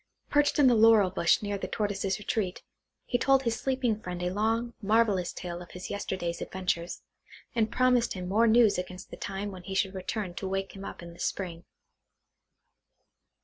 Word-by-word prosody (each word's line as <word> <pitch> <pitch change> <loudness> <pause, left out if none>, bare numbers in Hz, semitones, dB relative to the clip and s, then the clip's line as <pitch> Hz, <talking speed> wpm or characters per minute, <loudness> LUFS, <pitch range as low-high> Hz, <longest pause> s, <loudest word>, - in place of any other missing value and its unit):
Perched 290 0 +3
in 290 - +5
the 250 - +6
laurel 220 -4 +6
bush 170 +2 +2
near 205 -1 -2
the - - -3
Tortoise's 200 -2 -1
retreat, 205 -2 -2 0.4
he 245 - 0
told 270 0 +4
his 230 -2 -1
sleeping 255 -5 0
friend 180 -2 -5
a 180 - 0
long, 225 +3 0
marvellous 205 -4 +2
tale 175 -1 -6
of 175 - -11
his 180 - -7
yesterday's 185 -4 -3
adventures, 180 -2 -3 0.5
and 225 -1 +1
promised 250 -1 +3
him 180 -1 -5
more 220 +5 +3
news 220 -3 +5
against 180 0 -7
the - - -6
time 200 +1 -4
when 185 -2 -9
he 190 +2 -6
should 195 0 +1
return 190 0 -4
to 190 +2 -4
wake 195 +1 -3
him 195 - -8
up 175 - -7
in 170 0 -9
the 170 - -17
spring. 175 -3 -3
200 Hz, 185 wpm, -29 LUFS, 180-225 Hz, 0.5 s, the